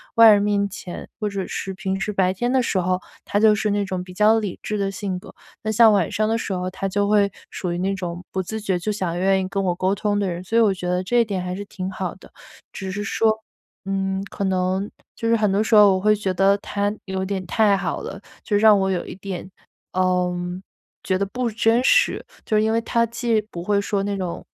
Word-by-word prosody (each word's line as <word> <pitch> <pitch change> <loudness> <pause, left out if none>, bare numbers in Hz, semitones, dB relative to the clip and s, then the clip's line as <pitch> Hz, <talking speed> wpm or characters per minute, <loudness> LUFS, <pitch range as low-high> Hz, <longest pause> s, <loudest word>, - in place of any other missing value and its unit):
外 230 -1 +9
人 205 - +5
面 200 -1 +1
前， 190 -2 -8
或 215 - -1
者 195 -2 -3
是 195 - -4
平 190 0 -3
时 210 +1 -2
白 185 -2 +2
天 240 +6 -1
的 260 - +3
时 195 - 0
候， 185 0 0 0.2
他 205 - -1
就 215 0 +6
是 210 +1 0
那 205 0 +1
种 185 -2 -3
比 180 0 -10
较 210 +4 +4
理 205 -5 -4
智 215 - -2
的 195 -1 0
性 195 -2 -4
格。 - - -14 0.3
那 220 - -2
像 225 0 +6
晚 195 -6 +2
上 215 0 0
的 225 - +1
时 200 - -3
候， 180 0 -2
他 190 +1 -4
就 205 +1 0
会 205 -1 +4 0.2
属 180 -2 -4
于 175 - -3
那 195 +2 0
种 175 -2 -5
不 190 - -1
自 220 +4 -5
觉 190 -4 0
就 195 - -3
想 175 -4 -2
愿 190 +1 +3
意 185 - -3
跟 195 - -1
我 175 - +1
沟 185 +2 +1
通 205 0 0
的 200 -2 0
人， 175 0 -4
所 225 - 0
以 - - +6
我 210 -3 +4
觉 180 -1 -5
得 180 +1 0
这 240 +5 +2
一 235 - +4
点 195 -4 -3
还 180 0 -3
是 205 +2 -5
挺 190 -1 -5
好 185 -2 -4
的。 - - -17 0.4
只 190 -2 -6
是 205 +2 -3
说， 220 +1 +1 0.4
嗯， 195 0 -1
可 200 - -4
能 190 +1 0 0.3
就 230 - -2
是 230 - +5
很 210 -2 +2
多 200 +2 +2
时 225 - -2
候 205 -2 +8
我 185 - 0
会 215 +2 +4
觉 195 -2 -2
得， 195 +2 +3
他 205 +1 -2
有 190 -1 -3
点 190 -1 -3
太 210 -3 +3
好 180 -4 -3
了， 200 - -7 0.2
就 205 - +1
让 210 -1 +6
我 190 0 +1
有 180 - -2
一 - - -8
点， 190 -1 -6 0.4
嗯， 180 -1 0 0.4
觉 185 - +1
得 200 - 0
不 245 +4 -2
真 225 +2 +2
实。 - - +3 0.2
就 215 - +1
是 - - +4
因 220 - +1
为 230 - +2
他 230 0 +1
既 230 -1 0
不 175 -5 -8
会 205 +1 +2
说 200 0 -1
那 200 0 -2
种， 180 -3 -4
195 Hz, 270 characters per minute, -22 LUFS, 185-210 Hz, 0.4 s, 外